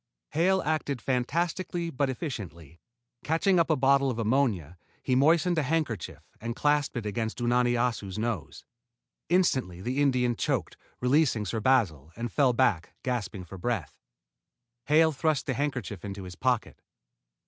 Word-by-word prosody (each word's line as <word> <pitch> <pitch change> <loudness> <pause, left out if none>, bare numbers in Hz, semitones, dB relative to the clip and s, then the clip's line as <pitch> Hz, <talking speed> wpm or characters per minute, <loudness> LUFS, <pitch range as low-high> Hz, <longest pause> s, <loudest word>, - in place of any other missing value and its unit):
Hale 185 +5 +2
acted 150 -4 -1
fantastically 170 +7 -1
but 135 0 0
efficiently. 90 - -6 0.4
Catching 170 +4 +2
up 170 - +2
a 160 - +4
bottle 135 0 +3
of 120 - -3
ammonia, 110 - 0 0.2
he 130 - 0
moistened 160 +5 +4
a - - +2
handkerchief 145 -6 -2 0.2
and 115 +1 -4
clapped 145 -2 +1
it 115 - -4
against 110 +2 -2
Unani 120 0 +2
Assu's 115 -5 -1
nose. 105 -11 -4 0.6
Instantly 130 - +1
the 125 +8 -1
Indian 125 -4 +2
choked, - - -1 0.3
released 135 +1 +3
Sir 110 +3 -2
Basil, 100 - +1
and 120 -1 -4
fell 135 +1 +3
back, 115 -9 +1
gasping 110 -7 -3
for 95 +2 -10
breath. 100 - -2 0.9
Hale 160 +2 +5
thrust 155 -1 0
the 130 - -1
handkerchief 125 -8 -3
into 100 -1 -6
his 90 -1 -8
pocket. 125 +1 -1
125 Hz, 145 wpm, -28 LUFS, 110-145 Hz, 0.9 s, Hale